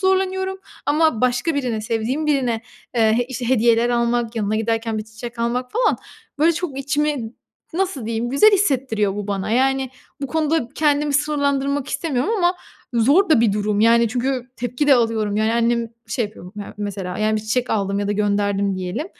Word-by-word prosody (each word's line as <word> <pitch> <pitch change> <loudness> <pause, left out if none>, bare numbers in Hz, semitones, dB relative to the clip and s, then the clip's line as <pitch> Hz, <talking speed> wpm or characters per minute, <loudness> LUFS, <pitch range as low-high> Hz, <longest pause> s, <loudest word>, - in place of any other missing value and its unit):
zorlanıyorum 380 0 0 0.3
ama 310 -5 +2
başka 250 +5 +1
birine 250 -6 -1
sevdiğim 230 +7 -2
birine, 255 -6 +1 0.3
eee, 225 +1 +3
işte, 245 -2 -4
hediyeler 235 -1 +3
almak 235 -1 0
yanına 215 0 0
giderken 225 0 -1
1 215 - -4
çiçek 230 +2 -9
almak 245 +2 -1
falan 485 +3 +2 0.4
böyle 330 +3 +4
çok 315 -5 -4
içimi 280 -4 -1 0.4
nasıl 355 - -1
diyeyim 230 +1 -2
güzel 280 +11 +6
hissettiriyor 255 - +1
bu 205 - -4
bana. 200 0 -2
Yani, 265 +2 +1 0.3
bu - - 0
konuda 315 -3 0
kendimi 295 -1 +2
sınırlandırmak 280 -1 0
istemiyorum 285 - -1
ama 355 0 +2 0.4
zor 280 - +4
da 305 - +6
bir 225 -4 +3
durum, 210 0 0
yani, 230 +1 +5
çünkü 250 +1 -2
tepki 245 +4 -2
de 275 - +8
alıyorum, 220 -3 +1
yani, 220 +1 +2
annem 235 0 +1 0.2
şey 240 - 0
yapıyor 195 -3 -12
ya 205 - -7
mesela, 195 -3 -4
yani, 215 0 +1
1 - - -1
çiçek 240 +3 -1
aldım 200 -2 0
ya 205 0 -2
da - - +1
gönderdim 200 -1 0
diyelim. 185 - -3
240 Hz, 170 wpm, -21 LUFS, 220-285 Hz, 0.4 s, de